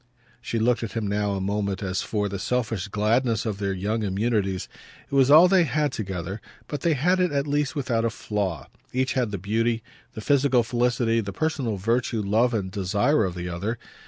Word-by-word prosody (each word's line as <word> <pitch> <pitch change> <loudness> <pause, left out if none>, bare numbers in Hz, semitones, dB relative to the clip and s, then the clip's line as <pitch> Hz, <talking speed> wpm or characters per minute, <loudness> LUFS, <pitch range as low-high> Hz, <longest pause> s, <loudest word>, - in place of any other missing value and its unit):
She 115 - -3
looked 120 +2 +2
at 115 - -5
him 115 -2 -2
now 100 0 0
a 95 - -2
moment 100 0 -2
as 95 0 -1
for 105 -2 -1
the 100 -1 -5
selfish 115 -5 -1
gladness 110 +3 +1
of 105 -3 -3
their 100 -1 -1
young 105 +4 -1
immunities. 100 -1 -1 0.4
It - - -15
was 135 -1 +4
all 160 +5 +9
they 185 -1 +5
had 150 0 0
together, 95 -1 -5 0.3
but 145 - -4
they 165 -3 +2
had 180 +7 +2
it 180 -1 +2
at 140 -1 0
least 145 -2 0
without 120 -5 0
a 115 - +2
flaw 100 - -3 0.3
each 130 +1 0
had 125 -4 0
the 100 - -3
beauty, 115 +4 0 0.3
the 110 - -7
physical 135 -1 +3
felicity, 120 -1 +1
the 100 -2 -5
personal 130 -1 -1
virtue, 115 +2 0
love 110 +5 +2
and 100 -5 -2
desire 100 +6 +1
of 90 -2 -4
the 90 0 -4
other. 95 +7 -3
110 Hz, 200 wpm, -25 LUFS, 100-125 Hz, 0.4 s, all